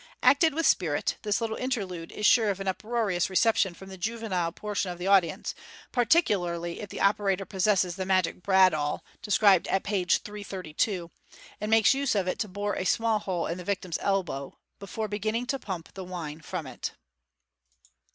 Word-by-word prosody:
Acted 305 +1 +5
with 330 0 0
spirit, 160 - +1
this 210 -2 0
little 225 -1 -2
interlude 195 -10 -3
is 210 - -3
sure 220 -1 +5
of 195 -1 -2
an 195 - -5
uproarious 205 -2 0
reception 190 -1 +2
from 190 +2 -12
the 190 -1 -10
juvenile 190 -5 -2
portion 205 0 -3
of 175 - -5
the 180 - -5
audience, 190 -5 +2 0.4
particularly 185 - +1
if 205 - -7
the - - -7
operator 200 -1 +2
possesses 190 -2 +1
the 190 - -2
magic 185 -2 +1
bradawl 185 -6 +3 0.2
described 200 -3 +4
at 190 - 0
page 190 -4 +1
332, 190 -3 -3 0.5
and 210 - -3
makes 225 +1 +5
use 275 -3 0
of 195 -3 +1
it 185 - -2
to 220 - -1
bore 205 +2 -3
a - - -1
small 225 +3 +2
hole 185 -4 -2
in 170 +2 -3
the - - -6
victim's 185 -2 -2
elbow 180 -9 -2 0.2
before 215 +2 -4
beginning 215 +3 -2
to 275 +2 -2
pump 180 -8 -6
the 190 - -7
wine 165 -4 -6
from 165 0 -5
it. 130 -2 -6
195 Hz, 175 wpm, -28 LUFS, 180-215 Hz, 0.5 s, Acted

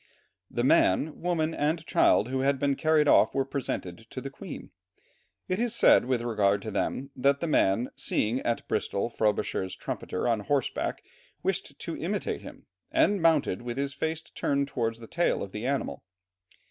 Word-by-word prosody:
The - - -2
man, 145 +12 +3
woman, 165 -2 0
and 155 +2 -1
child 115 - +3
who 130 0 -1
had 135 +1 +2
been 140 0 +1
carried 155 0 +3
off - - +5
were 135 -1 +1
presented 135 -1 -4
to - - -6
the - - -6
Queen. - - -9 0.8
It 185 +2 -1
is 235 -1 0
said - - +6
with 125 -2 0
regard 100 -4 +1
to 110 - -5
them, 135 +6 -2
that 140 +2 +2
the - - -2
man, 120 -6 +2
seeing 115 +4 0
at 120 -2 -2
Bristol 100 +4 -1
Frobisher's 105 -4 0
trumpeter 90 - -4
on 115 -2 +2
horseback 135 +5 -1 0.4
wished - - -2
to - - -5
imitate - - -2
him, - - -12 0.3
and 205 -3 +3
mounted 155 - +3
with 120 0 -5
his 140 0 -2
face 160 0 -2
turned 140 0 -1
towards 115 -4 -2
the 115 - -11
tail 175 +7 0
of 100 - -7
the 105 +5 -4
animal. 140 0 -2
135 Hz, 170 wpm, -28 LUFS, 115-155 Hz, 0.8 s, said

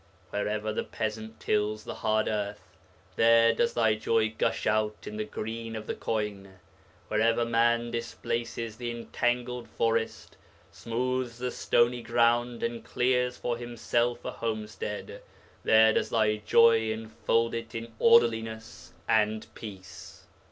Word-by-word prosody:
Wherever 105 +1 -2
the - - -1
peasant 110 0 -5
tills 105 +1 0
the - - -6
hard 110 -1 0
earth, 100 -2 -4 0.4
there 115 0 +6
does 235 0 +1
thy 110 -2 +3
joy 110 0 +1
gush - - 0
out 110 0 0
in 105 - -6
the 110 - -2
green 115 +1 -5
of 110 0 -6
the - - -3
corn; 100 -3 -4 0.5
wherever 115 +2 +2
man 115 0 +2
displaces 115 -1 -4
the 120 0 -4
entangled 120 +1 -2
forest, 115 0 -1 0.3
smooths 125 +1 -2
the 125 0 -3
stony 120 +1 +2
ground, 120 0 +1
and 115 0 -2
clears 125 0 +1
for 120 - -2
himself 120 0 -1
a - - -2
homestead, 105 -2 -5 0.4
there 110 0 +6
does - - 0
thy 110 -1 +2
joy 110 +1 +4
enfold 115 +1 -1
it 115 -1 -5
in 115 0 -6
orderliness 115 - +2
and 110 0 +2
peace. 95 -5 -10
115 Hz, 130 wpm, -28 LUFS, 110-120 Hz, 0.5 s, there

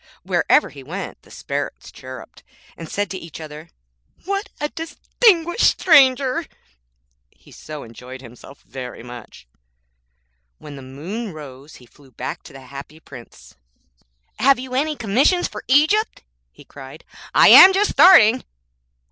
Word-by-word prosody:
Wherever - - +1
he - - -12
went - - -8
the - - -23
Sparrows - - -6
chirruped, 130 0 -12 0.3
and 165 -2 -10
said 205 -1 -3
to 190 - -5
each 165 -2 -11
other, 155 +1 -11 0.6
'What 395 +2 -3
a 295 - -3
distinguished 345 +4 0
stranger!' 280 -1 +3 1.0
so 150 -2 -10
he - - -12
enjoyed 125 +3 -12
himself 125 +2 -15
very 125 -3 -9
much. 120 - -13 1.1
When 145 -1 -12
the 135 - -11
moon 175 - -7
rose 145 -1 -12
he 125 - -17
flew 135 +3 -22
back 125 - -7
to - - -13
the 135 - -12
Happy 140 +4 -12
Prince. - - -15 0.9
'Have 270 +3 +4
you 255 0 -9
any 300 +4 -1
commissions 270 - +1
for 210 - -10
Egypt?' 310 - +1 0.3
he - - -18
cried; 135 +2 -13 0.3
'I - - +6
am 380 - +10
just 400 +2 +1
starting.' 255 - +6
190 Hz, 140 wpm, -20 LUFS, -, 1.1 s, am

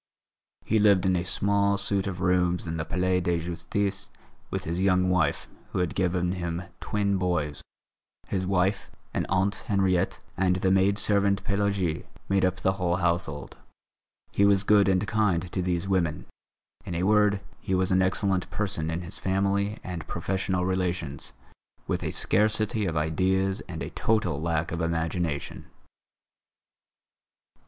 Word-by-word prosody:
He 110 - +2
lived 100 -3 +4
in 95 -1 +3
a 85 - 0
small 100 +2 +2
suite 100 -1 +1
of 95 -3 -4
rooms 90 -1 +2
in 80 -1 -3
the 80 - -2
Palais 90 +2 +1
de 85 -1 0
Justice 95 +4 -2 0.4
with - - -3
his 85 +2 -3
young 90 -1 +3
wife, 85 -6 +1 0.3
who - - -1
had 90 -2 0
given 90 -1 0
him 85 -1 -3 0.2
twin 100 -1 0
boys. 85 -5 -1 0.7
His 95 -1 -1
wife, 95 +1 0 0.2
an - - -1
aunt 95 +3 +1
Henriette 95 -3 +1 0.2
and 90 -1 +2
the 95 +1 +1
maid 95 +1 +3
servant 100 -1 +2
Pélagie 100 -5 -1 0.2
made 95 0 +2
up 95 0 0
the 95 - +3
whole 90 -2 0
household. 85 -5 -2 0.7
He 100 - +2
was 100 -1 +5
good 100 -1 +5
and 95 +1 +2
kind 95 -5 +1
to 95 - -1
these 90 0 -1
women. 85 -6 0 0.6
In 85 - -5
a 85 - -1
word, 105 0 +4 0.2
he 95 - -1
was 95 0 +1
an 95 0 +4
excellent 95 0 +1
person 95 -6 -2
in 80 +2 -2
his 85 - -5
family 100 +2 0
and 85 -4 -6
professional 95 -1 -1
relations, 90 -6 -2 0.5
with - - -2
a - - -1
scarcity 110 0 +1
of 80 -2 -2
ideas 95 +5 +1
and 80 -2 -5
a - - -6
total 105 -10 0
lack 80 -1 -1
of 85 +1 -3
imagination. 80 -2 -2
95 Hz, 155 wpm, -27 LUFS, 85-100 Hz, 0.7 s, was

